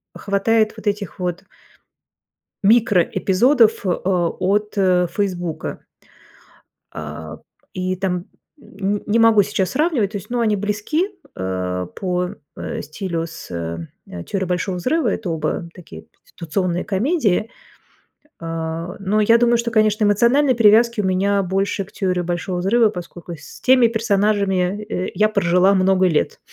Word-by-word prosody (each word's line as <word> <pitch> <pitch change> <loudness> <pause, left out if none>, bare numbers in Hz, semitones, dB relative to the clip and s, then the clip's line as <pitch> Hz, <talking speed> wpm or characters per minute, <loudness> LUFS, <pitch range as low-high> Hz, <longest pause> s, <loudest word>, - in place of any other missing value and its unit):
хватает 215 +2 +1
вот 220 -1 -9
этих 200 -4 -2
вот 180 -1 -3 1.2
микроэпизодов, 220 - +3
а, 180 -1 +1
от, 205 +5 -1
э, 180 -2 +3
"Фейсбука". 180 -5 -3 1.1
А, 75 +1 -7 0.4
и 185 0 -2
там 180 -1 -2 0.3
н 200 -4 -4
не 215 +2 +2
могу 225 -2 +6
сейчас 190 -2 -1
сравнивать, 280 - 0
то 205 - -3
есть, 190 - -12
ну, 245 0 -1
они 220 -2 +2
близки, 210 - -1 0.3
э, 90 -1 -3
по, 180 -1 -1 0.3
э, - - -4
стилю 165 +2 -4
с, 165 - -11
э, 85 0 -7
"Теорией 190 -1 -2
Большого 180 +1 -1
взрыва", 305 - 0
это 195 -6 -2
оба 160 +1 -2
такие 85 - -12
конституционные 175 +1 -3
комедии. 220 - 0 0.9
Э, 165 +1 -4
но 200 +2 +1
я 230 +2 +5
думаю, 240 0 +3
что, 235 0 -2
конечно, 215 -1 +2
эмоциональной 240 +7 +3
привязки 230 0 +4
у - - -1
меня 195 +2 +1
больше 195 +2 -1
к 190 - -19
"Теории 185 -2 -1
Большого 175 +1 -3
взрыва", 220 +5 +3
поскольку 175 -2 -8
с 150 - -13
теми 255 -2 +5
персонажами 205 -3 +1
я, 180 +1 +1 0.3
э, - - -5
я 215 +1 +3
прожила 190 -1 +3
много 190 0 +3
лет. 160 -4 0
195 Hz, 140 wpm, -20 LUFS, 180-215 Hz, 1.2 s, могу